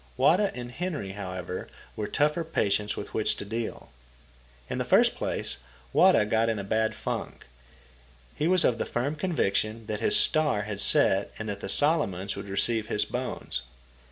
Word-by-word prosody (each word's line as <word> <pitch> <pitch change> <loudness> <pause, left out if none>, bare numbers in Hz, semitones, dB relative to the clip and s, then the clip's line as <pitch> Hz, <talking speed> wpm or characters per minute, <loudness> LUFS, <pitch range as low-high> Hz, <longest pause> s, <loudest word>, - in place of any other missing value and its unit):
Wada 195 +4 +4
and 120 -1 -6
Henry, 150 - -4
however, 95 -2 -5 0.3
were 105 - -3
tougher 150 +3 +1
patients 105 -9 0
with 100 - -7
which 110 - +1
to - - -7
deal. 115 +2 -5 0.8
In - - -3
the - - +1
first - - +4
place, - - -2 0.4
Wada 105 - +5
got 110 +2 +2
in 110 - 0
a 100 - -4
bad 110 +2 0
funk. - - -5 0.9
He 155 - 0
was 185 0 +6
of 115 -2 +2
the - - -2
firm 135 +5 -1
conviction 115 - -1
that 105 -1 -3
his 210 - +3
star 155 - +3
had 105 -1 -4
set 100 0 +3
and 110 - -5
that 100 -1 -4
the 95 - -6
Solomons 100 - +1
would 100 0 -7
receive 110 +2 0
his 105 -2 +1
bones. 125 - -3
110 Hz, 170 wpm, -27 LUFS, 100-150 Hz, 0.9 s, was